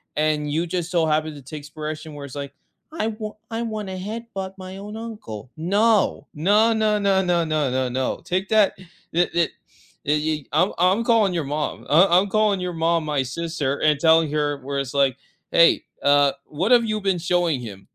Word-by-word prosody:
and 150 -1 0
you 160 +3 0
just 175 0 -3
so 170 -3 +2
happen 155 0 0
to 145 - -10
take 145 +3 -9
spiration 155 +1 -6
where 145 -1 -8
it's 140 - -10
like, 140 -1 -6 0.4
"I 320 -9 -1
wa 215 -1 -5 0.2
I 225 +1 -2
wanna 210 -4 -4
headbutt 195 -1 -6
my 185 0 -8
own 205 +2 -8
uncle," 215 - -8
no, 205 +6 +2
no, 205 +9 +3
no, 215 -1 +1
no, 195 -1 +3
no, 175 -1 +2
no, 155 -3 0
no, 130 0 0
no, 130 +1 -2
take 185 +2 -1
that 210 -2 +4 0.3
the 175 +2 +3
the 170 -2 +2 0.6
ye 150 - +2 0.3
ye - - -31
I'm 170 +6 +3
I'm 185 +6 +3
calling 225 -5 +3
your 170 -3 -1
mom, 150 +2 -3
uh, 165 +7 +6
I'm 185 +4 +4
calling 210 -2 +2
your 180 -1 -3
mom, 165 0 +1
my 150 -3 0
sister, 145 0 -3
and 150 -2 +3
telling 160 -1 +4
her 150 -1 0
where 140 +1 -3
it's 135 -2 -4
like, 135 -3 +2 0.4
"Hey, 170 - +5 0.2
uh, 145 -1 +4
what 175 +10 -2
have 240 - +6
you 215 -1 -1
been 195 -3 0
showing 175 -4 +1
him?" 100 -4 -9
170 Hz, 195 wpm, -23 LUFS, 150-200 Hz, 0.6 s, uh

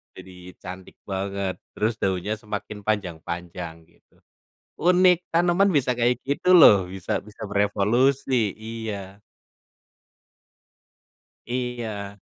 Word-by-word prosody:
jadi 90 -1 -12
cantik 90 +1 -9 0.2
banget 95 0 -3 0.2
terus 110 +1 0
daunnya 95 +2 0
semakin 105 -1 -6
panjang-panjang, 85 -3 -3
gitu. - - -31 0.6
Unik, 180 +1 +5
tanaman 175 +4 +3
bisa 135 -5 +2
kayak 120 +1 +1
gitu 145 +6 +1
loh, 100 - +8
bisa 95 0 -3
bisa 105 0 -11
berevolusi. 110 +3 +2
Iya. 105 -3 -6 2.3
Iya. 115 -5 -4
105 Hz, 90 wpm, -24 LUFS, 95-125 Hz, 2.3 s, loh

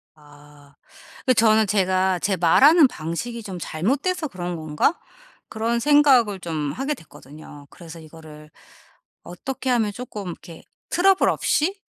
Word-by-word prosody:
아. 145 -1 -20 0.5
그 255 - +4
저는 220 -2 +3
제가 185 -2 +1
'제 195 +1 -1
말하는 275 - +5
방식이 225 +8 -6
좀 190 -3 -7
잘못돼서 280 - -2
그런 180 -6 -6
건가?' 155 - -1 0.5
그런 230 +2 -2
생각을 260 -7 +4
좀 155 -5 -4
하게 275 +3 -3
됐거든요. 150 - -14
그래서 165 -1 -12
이거를 155 -1 -14 0.7
어떻게 260 +9 -6
하면 230 -4 +1
쪼끔 210 -3 -8
이렇게 170 -1 -11 0.3
'트러블 385 +1 +3
없이 380 +7 0
190 Hz, 275 characters per minute, -22 LUFS, 160-255 Hz, 0.7 s, 말하는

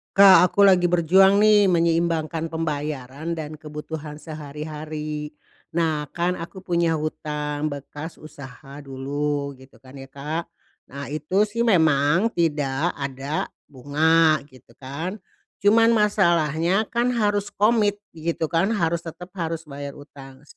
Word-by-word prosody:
Kak, 190 -3 +8
aku 200 0 +4
lagi 180 -2 +5
berjuang 190 +3 +5
nih 210 -1 +5
menyeimbangkan 165 -1 +1
pembayaran 150 -1 -4
dan 155 -1 -5
kebutuhan 150 0 -7
sehari-hari. 150 0 -6 0.4
Nah, 160 -3 -1
kan 175 +1 -1
aku 180 +2 -9
punya 170 -2 +1
hutang 150 -1 -3
bekas 145 +3 -8
usaha 140 -1 -11
dulu, 140 +1 -3
gitu 130 0 -18
kan, 130 0 -16
ya, 135 -1 -10
Kak. 150 +5 -5 0.4
Nah, 140 +1 -7
itu 170 +7 +1
sih 225 +3 -3
memang 160 -4 +3
tidak 150 -2 0
ada 140 +1 -3 0.2
bunga, 155 +4 +3
gitu 130 -3 -19
kan. 160 +10 -5 0.4
Cuman 225 +3 +5
masalahnya 175 -2 +2
kan, 240 +1 0
harus 205 -3 0
komit, 210 -1 +2
gitu 165 -1 -3
kan, 185 +6 +1
harus 170 -4 -1
tetep 175 +2 -9
harus 165 -2 -3
bayar 140 0 -7
hutang 135 -2 -13
160 Hz, 125 wpm, -23 LUFS, 145-180 Hz, 0.4 s, Kak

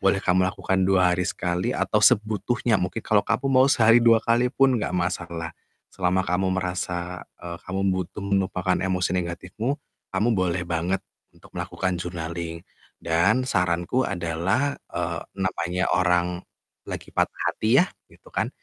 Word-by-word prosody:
boleh - - +2
kamu 90 +1 +3
lakukan 95 0 0
2 95 -1 +4
hari 90 +1 0
sekali 90 -1 -1
atau - - +1
sebutuhnya 110 +2 +2
mungkin 95 +4 -2
kalo 105 -1 +4
kamu 115 +4 0
mau 130 0 +5
sehari 115 -3 +6
2 115 -1 +6
kali 120 +2 +2
pun 135 -2 +4
nggak 105 - -2
masalah. 85 -2 -2 0.4
Selama 95 0 +1
kamu 95 +2 +1
merasa, 90 -1 -3 0.2
eee, 85 0 -6
kamu 95 +1 -3
butuh 95 +2 -3
menumpahkan 95 -2 0
emosi 95 -1 0
negatifmu 90 +9 -3 0.4
kamu, 105 +5 +1
boleh 90 -1 0
banget 85 +3 0 0.3
untuk - - -18
melakukan 95 -1 -2
journaling. 85 -1 -5 0.4
Dan 85 +10 +2
saranku 90 +8 +1
adalah, 95 +10 -1 0.2
eee, 85 -1 -2 0.2
namanya 90 -1 -1
orang 90 -1 +1 0.4
lagi - - -6
patah - - -1
hati 115 +5 +3
ya, - - -1 0.3
gitu - - -18
kan, - - 0
90 Hz, 145 wpm, -25 LUFS, 85-105 Hz, 0.4 s, sehari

